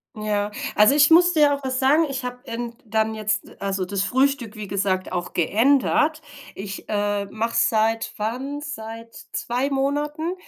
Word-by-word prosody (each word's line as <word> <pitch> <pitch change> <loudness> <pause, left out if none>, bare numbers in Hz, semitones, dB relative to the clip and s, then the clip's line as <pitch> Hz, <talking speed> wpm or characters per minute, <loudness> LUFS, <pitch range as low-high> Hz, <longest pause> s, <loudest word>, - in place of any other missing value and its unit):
Ja, 210 -1 -1 0.2
also 210 +5 +6
ich 290 0 +6
muss 350 +2 +6
dir 300 -4 +4
auch 280 0 -4
was 260 -1 -1
sagen, 285 +5 +4
ich 265 -1 -4
habe 250 +1 -7
end 235 -1 -5
dann 220 0 0
jetzt 215 -1 -2
also 195 -1 -1
das 195 +1 -1
Frühstück 260 0 0
wie 210 -1 -6
gesagt, 190 -1 -1
auch 175 0 -3
geändert. 275 - +2 0.3
Ich, 195 0 -7
äh, 205 -1 0
mache 225 +1 -2
seit 225 +1 +1
wann? 255 +7 -3
Seit 230 -6 -8 0.2
2 250 +4 -1
Monaten 295 +4 -1
230 Hz, 160 wpm, -23 LUFS, 210-280 Hz, 0.3 s, also